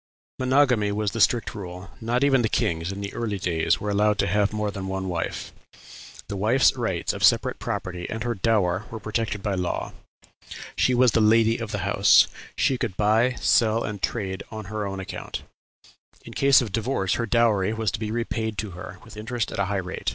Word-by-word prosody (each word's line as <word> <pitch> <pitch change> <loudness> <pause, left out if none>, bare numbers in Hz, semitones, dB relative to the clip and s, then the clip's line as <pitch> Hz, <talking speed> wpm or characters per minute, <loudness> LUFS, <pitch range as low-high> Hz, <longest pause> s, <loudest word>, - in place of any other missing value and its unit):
Monogamy 130 -5 +3
was 105 0 -1
the 115 - -2
strict 120 +2 +2
rule; 90 -2 -8
not 120 +3 0
even 135 -3 +4
the 110 - 0
kings, 85 -1 -1
in 100 +1 -6
the 100 - -5
early 110 -4 -2
days, 85 -1 0
were 105 - -3
allowed 105 +1 +2
to - - +1
have 100 +2 +1
more 105 -1 -2
than 100 -1 -6
one 95 0 -3
wife. 85 -2 -4 0.7
The 100 - -5
wife's 115 +8 +3
rights 110 -9 -1
of - - -5
separate - - +3
property 90 -1 -4
and 110 +1 -4
her 120 -1 -1
dower 100 -3 +1
were 110 - -6
protected 110 -2 -3
by 105 - -1
law; 90 -2 -2 0.8
she 125 - +2
was 125 -1 +5
"the 115 - +2
lady 115 +1 +4
of 115 -2 -5
the 100 -3 -3
house;" 100 0 +5 0.3
she 130 -2 +1
could 95 - -3
"buy, 110 +4 +3
sell, 115 0 +3
and 105 -2 -5
trade 95 -5 -2
on 110 -2 -7
her 105 -2 -2
own 95 0 -5
account;" 95 - -6 0.8
in - - -9
case 140 -1 +5
of 115 -5 -4
divorce 110 -3 0
her 115 - -1
dowry 105 -3 +2
was 110 -3 -1
to - - -4
be 110 -1 -3
repaid 110 -1 -2
to 105 -1 -4
her, 90 +1 -9
with 110 -1 -13
interest 115 +1 -3
at - - -5
a 100 - +2
high 100 +1 -1
rate. 95 -1 -3
105 Hz, 205 wpm, -25 LUFS, 95-115 Hz, 0.8 s, was